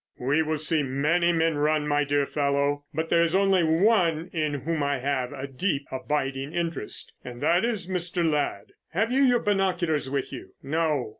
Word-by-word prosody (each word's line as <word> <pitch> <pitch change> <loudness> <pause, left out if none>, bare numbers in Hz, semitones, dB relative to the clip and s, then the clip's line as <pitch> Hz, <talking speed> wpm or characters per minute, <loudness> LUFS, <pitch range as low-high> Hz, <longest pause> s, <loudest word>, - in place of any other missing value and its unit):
"We 140 +5 +1
will 155 0 -1
see 155 +1 +1
many 150 +6 +1
men 165 -2 +1
run, 150 0 +1
my 145 0 +2
dear 145 0 +1
fellow, 140 0 0
but 160 +2 -3
there 170 - +4
is 170 +1 +2
only 195 -2 +3
one 170 -1 +2
in 155 -3 -1
whom 155 +3 -2
I 140 0 0
have 130 -1 -2
a 135 - -6
deep 140 +1 -2
abiding 135 +1 -3
interest, 170 -9 -4
and 120 -1 -8
that 170 +6 +3
is 220 -6 -1
Mr. 175 -2 -1
Ladd. 145 -10 -1 0.2
Have 220 +7 +1
you 265 +2 +2
your 245 -3 +4
binoculars 180 -8 0
with 140 -1 -3
you?" - - -9
"No." 150 -3 0
155 Hz, 180 wpm, -26 LUFS, 140-175 Hz, 0.2 s, there